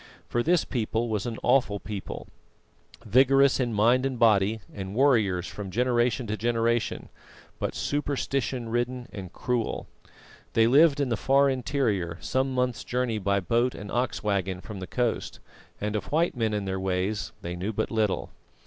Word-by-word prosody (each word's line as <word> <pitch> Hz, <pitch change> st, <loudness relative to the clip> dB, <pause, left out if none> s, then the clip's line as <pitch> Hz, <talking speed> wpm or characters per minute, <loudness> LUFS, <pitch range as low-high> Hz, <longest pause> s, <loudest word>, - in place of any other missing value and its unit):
For 120 Hz, -, 0 dB
this 170 Hz, +5 st, +2 dB
people 115 Hz, -1 st, -1 dB
was 105 Hz, +1 st, -1 dB
an 115 Hz, -2 st, -4 dB
awful 120 Hz, -5 st, +3 dB
people: 100 Hz, -2 st, -6 dB, 0.8 s
vigorous 135 Hz, +4 st, +5 dB
in 125 Hz, -2 st, 0 dB
mind 115 Hz, +4 st, +3 dB
and 135 Hz, -2 st, -1 dB
body, 110 Hz, -1 st, +3 dB
and 95 Hz, 0 st, -6 dB
warriors 110 Hz, -10 st, +3 dB
from 100 Hz, 0 st, -6 dB
generation 120 Hz, +2 st, +1 dB
to 105 Hz, 0 st, -2 dB
generation, 115 Hz, 0 st, 0 dB, 0.5 s
but -, -, -2 dB
superstition 135 Hz, -4 st, -2 dB
ridden 120 Hz, +1 st, -2 dB
and 95 Hz, -3 st, -7 dB
cruel. 120 Hz, 0 st, -2 dB, 0.7 s
They 115 Hz, -, +5 dB
lived 145 Hz, +4 st, +5 dB
in 140 Hz, -3 st, +1 dB
the 115 Hz, -, 0 dB
far 135 Hz, +5 st, +3 dB
interior, 115 Hz, -, -1 dB
some 130 Hz, +1 st, 0 dB
months' 125 Hz, -3 st, -1 dB
journey 120 Hz, -3 st, -1 dB
by 100 Hz, 0 st, +1 dB
boat 120 Hz, +6 st, +1 dB
and 105 Hz, -, -8 dB
ox 125 Hz, +2 st, -1 dB
waggon 95 Hz, -3 st, -1 dB
from 100 Hz, +1 st, -8 dB
the 95 Hz, -, -6 dB
coast, 120 Hz, 0 st, -2 dB, 0.4 s
and 105 Hz, +1 st, -2 dB
of 105 Hz, -, -2 dB
white 165 Hz, +2 st, +2 dB
men 115 Hz, -3 st, 0 dB
and 100 Hz, -2 st, -2 dB
their 95 Hz, 0 st, -2 dB
ways 95 Hz, +2 st, -1 dB
they 85 Hz, 0 st, -4 dB
knew 95 Hz, +5 st, -3 dB
but 110 Hz, 0 st, -2 dB
little. 110 Hz, -3 st, 0 dB
115 Hz, 165 wpm, -27 LUFS, 100-125 Hz, 0.8 s, vigorous